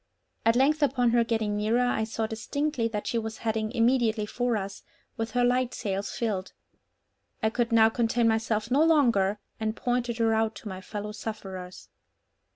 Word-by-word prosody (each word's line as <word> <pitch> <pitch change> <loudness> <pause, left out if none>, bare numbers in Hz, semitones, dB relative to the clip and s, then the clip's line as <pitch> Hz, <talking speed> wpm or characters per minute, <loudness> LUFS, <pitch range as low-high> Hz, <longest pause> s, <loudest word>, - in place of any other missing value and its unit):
At 230 - +5
length 290 +5 +3
upon 255 -4 +3
her 235 0 +4
getting 220 -2 -1
nearer, 220 +4 +2
I 220 -3 0
saw 220 0 -2
distinctly 240 +3 -2
that 210 -2 -4
she 235 - 0
was 220 -1 -5
heading 220 -1 0
immediately 230 -2 +2
for 245 +1 -1
us, 195 -1 -6 0.3
with 225 0 -3
her 245 - +2
light 250 0 +1
sails 200 -2 -3
filled. 200 -5 -2 0.9
I 220 - +2
could 235 0 0
now 225 -1 +6
contain 230 0 +1
myself 220 0 0
no 285 +4 +5
longer, 235 -11 +3 0.2
and 220 0 -1
pointed 245 -1 -1
her 225 -1 +2
out 220 0 +1
to - - -9
my 190 -2 -6
fellow 210 +1 -6
sufferers. 190 -4 -7
225 Hz, 170 wpm, -27 LUFS, 215-245 Hz, 0.9 s, now